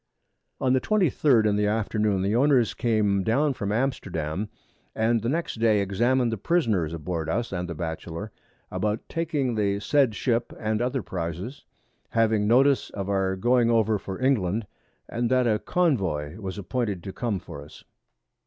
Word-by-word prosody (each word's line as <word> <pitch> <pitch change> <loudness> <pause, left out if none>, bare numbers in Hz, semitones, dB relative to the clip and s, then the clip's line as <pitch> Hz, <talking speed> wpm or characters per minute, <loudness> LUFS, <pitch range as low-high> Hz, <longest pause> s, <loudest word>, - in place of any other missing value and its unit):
_] - - -1
On 130 - +4
the 130 - +2
23d 150 - +3
in 105 -1 +2
the 105 0 +2
Afternoon, 105 -2 0
the 100 +3 +1
Owners 130 -3 +3
came 105 -4 +1
down 140 +8 +2
from 100 -6 -3
Amsterdam, 105 - -2 0.5
and 115 +1 +2
the 115 - -1
next 165 -3 -2
Day 110 -2 +4
examin'd 120 +5 +1
the 115 - -3
Prisoners 110 - +1
aboard 80 -1 -4
Us 115 +8 -1
and 90 -1 -3
the 85 - -4
Batchelor, 85 +5 -5 0.4
about 105 +1 -2
taking 150 -6 -1
the 100 -2 0
said 130 0 +2
Ship 120 -1 0
and 110 0 -1
other 125 -1 -1
Prizes, 90 - -5 0.4
having 110 -2 +2
Notice 130 +2 +4
of 100 -1 -5
our 95 -1 +1
going 120 +4 +3
over 110 -2 +2
for 95 -1 -6
England, 115 -5 +1 0.4
and 120 0 -1
that 130 0 +3
a 110 -3 +2
Convoy 95 - 0
was 95 -2 -5
appointed 100 -2 -2
to 95 - -6
come 115 -5 -2
for 70 -5 -9
us. 75 - -15
110 Hz, 165 wpm, -26 LUFS, 95-125 Hz, 0.5 s, On